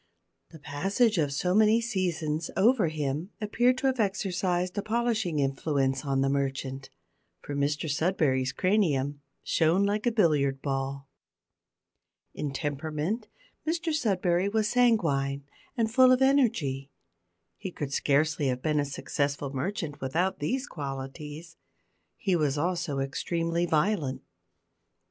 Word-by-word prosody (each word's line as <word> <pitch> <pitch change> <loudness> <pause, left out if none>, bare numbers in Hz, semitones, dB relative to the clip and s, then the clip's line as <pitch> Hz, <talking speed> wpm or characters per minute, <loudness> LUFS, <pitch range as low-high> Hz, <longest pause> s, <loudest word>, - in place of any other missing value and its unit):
The 165 - -12
passage 190 - +1
of 145 -3 +1
so 180 +6 0
many 215 +2 +5
seasons 175 -8 -2
over 215 -1 +4
him 155 +2 -2
appeared 240 +4 +2
to 270 - -3
have 260 -2 +1
exercised 185 -3 0
a 205 - 0
polishing 220 -6 0
influence 135 -1 0
on 135 -2 0
the 135 - +2
merchant, 135 -1 -2 0.5
for 145 - -6
Mr 145 +2 0
Sudberry's 145 -4 +1
cranium 145 -7 +1 0.2
shone 165 +4 +2
like 210 +3 0
a - - +4
billiard 150 - +2
ball. 135 0 -3 1.3
In 145 - -3
temperament 155 - -3 0.4
Mr 330 0 0
Sudberry 190 - +1
was 215 -1 +1
sanguine, 165 - +2 0.3
and 225 -1 +1
full 255 0 +7
of 255 - +5
energy. 215 - +2 0.7
He 190 - -5
could 145 -5 -5
scarcely 145 +1 +2
have 125 -1 -2
been 150 -1 +1
a 145 - +1
successful 140 0 -2
merchant 150 +1 -3
without 165 +9 0
these 255 - -1
qualities. 150 - -7 0.6
He 190 -3 +1
was 150 -4 +1
also 170 -2 -1
extremely 165 +5 -1
violent. 160 -4 0
160 Hz, 125 wpm, -28 LUFS, 140-205 Hz, 1.3 s, full